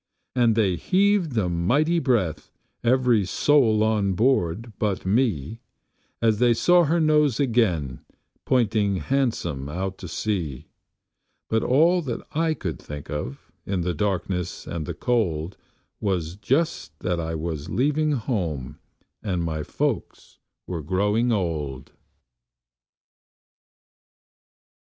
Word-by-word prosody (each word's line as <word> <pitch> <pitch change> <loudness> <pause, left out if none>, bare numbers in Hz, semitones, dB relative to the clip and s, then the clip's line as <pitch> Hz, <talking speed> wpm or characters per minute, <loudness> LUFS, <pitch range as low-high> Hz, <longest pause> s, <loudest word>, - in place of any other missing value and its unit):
And 120 -3 +3
they 100 -6 +2
heaved 185 - +2
a 100 -5 +2
mighty 135 - +2
breath, 95 - 0 0.3
every 125 -3 +3
soul 110 +1 +3
on 105 -3 +1
board 110 -1 +1
but 105 -4 -1
me, 105 - 0 0.6
As 110 -2 +3
they 120 -1 +4
saw 175 +7 +4
her 165 +4 +2
nose 150 -5 +3
again 110 - +1 0.4
pointing 110 -5 +2
handsome 85 - -1
out 95 +4 -4
to 90 - -7
sea; 80 -8 -3 0.9
But 110 0 +2
all 165 +7 +4
that 130 -7 -4
I 160 0 +1
could 85 - -5
think 75 +1 -8
of, 75 -2 -6
in 95 -2 -2
the 90 +1 -1
darkness 90 0 -2
and 80 -3 -5
the - - -4
cold, 95 -8 -1 0.4
Was 90 -4 -1
just 105 - -1
that 90 -1 -1
I 80 0 -3
was 80 -2 -4
leaving 150 +3 +1
home 90 - -3 0.4
and 90 -5 -1
my 80 -2 -2
folks - - -3 0.3
were 85 -3 -4
growing 105 - +1
old. 75 - -2
105 Hz, 120 wpm, -24 LUFS, 85-125 Hz, 0.9 s, they